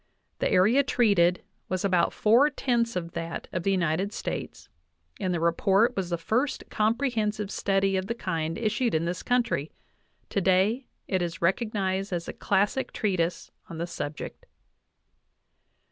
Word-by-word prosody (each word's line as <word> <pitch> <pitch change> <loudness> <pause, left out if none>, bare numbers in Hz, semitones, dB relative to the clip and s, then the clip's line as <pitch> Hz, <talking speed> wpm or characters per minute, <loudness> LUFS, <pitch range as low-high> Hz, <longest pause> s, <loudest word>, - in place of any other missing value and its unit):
The - - +1
area 205 +9 +5
treated 200 -10 +3 0.3
was 185 +1 -1
about 180 -3 +3
four 235 +7 +4
tenths 235 -5 0
of 170 -2 -3
that 165 0 -5
of 180 - -1
the 195 - 0
United 185 +1 +1
States, - - -5 0.5
and 185 - -1
the 175 - 0
report 195 +8 +3
was 190 -3 -2
the 170 - 0
first 245 - -1
comprehensive 215 -3 0
study 195 0 +1
of 185 0 -2
the 230 - -2
kind 165 -7 -2
issued 225 -1 0
in 160 +1 +1
this 175 +1 -3
country; 235 - 0 0.6
today 200 +6 +2 0.2
it 185 -1 0
is 170 -1 -4
recognized 195 0 0
as 170 -2 -3
a - - -5
classic 205 +6 0
treatise 180 -5 -1 0.2
on 165 - -7
the 170 - -2
subject. 150 -3 -6
195 Hz, 145 wpm, -27 LUFS, 175-220 Hz, 0.6 s, area